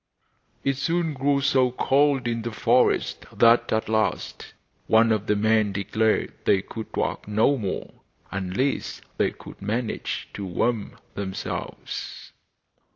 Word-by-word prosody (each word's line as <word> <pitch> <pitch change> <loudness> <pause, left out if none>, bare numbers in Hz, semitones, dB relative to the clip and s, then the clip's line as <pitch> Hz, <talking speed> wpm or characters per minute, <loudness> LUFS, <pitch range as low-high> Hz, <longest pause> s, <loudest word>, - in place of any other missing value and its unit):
It 135 -1 +1
soon 165 +2 0
grew 140 +1 +1
so 130 -2 +3
cold 135 +1 +2
in 115 -1 -1
the 120 +1 -4
forest 105 - +2
that 115 0 +4
at 110 0 0
last 110 0 -1 0.3
one 115 +1 +5
of 110 -1 0
the 105 - +3
men 110 0 +2
declared 110 +3 0
they 95 -1 +3
could 110 -1 -7
walk - - -2
no 110 +7 +3
more, 100 -7 -4 0.4
unless 95 +8 -2 0.2
they - - +3
could - - -13
manage 110 +3 -3
to 100 - -5
warm 105 +4 -1 0.2
themselves. 95 -2 -5
110 Hz, 130 wpm, -25 LUFS, 105-130 Hz, 0.4 s, one